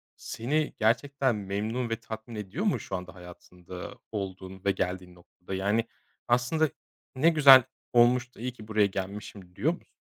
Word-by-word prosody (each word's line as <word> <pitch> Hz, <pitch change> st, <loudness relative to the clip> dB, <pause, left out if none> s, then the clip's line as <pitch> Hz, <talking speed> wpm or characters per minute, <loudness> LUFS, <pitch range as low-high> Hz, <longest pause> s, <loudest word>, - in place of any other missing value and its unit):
seni 150 Hz, +7 st, -2 dB
gerçekten 130 Hz, +3 st, +2 dB
memnun 105 Hz, +5 st, -3 dB
ve 115 Hz, -, 0 dB
tatmin 110 Hz, +1 st, -8 dB
ediyor 105 Hz, -, -4 dB
mu 205 Hz, -, +2 dB
şu 95 Hz, -, -5 dB
anda 90 Hz, +1 st, -7 dB
hayatında 90 Hz, 0 st, -10 dB
olduğun 95 Hz, -2 st, -6 dB
ve 100 Hz, -, +4 dB
geldiğin 90 Hz, -1 st, -3 dB
noktada? 90 Hz, +2 st, -11 dB
Yani, 105 Hz, +4 st, 0 dB, 0.4 s
aslında 125 Hz, +6 st, +2 dB, 0.5 s
ne 150 Hz, +6 st, +5 dB
güzel 140 Hz, -5 st, +9 dB, 0.3 s
olmuş 120 Hz, +1 st, +4 dB
da -, -, -16 dB
iyi 125 Hz, +2 st, -3 dB
ki 110 Hz, -3 st, -13 dB
buraya 110 Hz, -2 st, +3 dB
gelmişim 95 Hz, -1 st, -6 dB
diyor 160 Hz, -, +1 dB
musun? 175 Hz, -, -13 dB
110 Hz, 155 wpm, -28 LUFS, 95-125 Hz, 0.5 s, güzel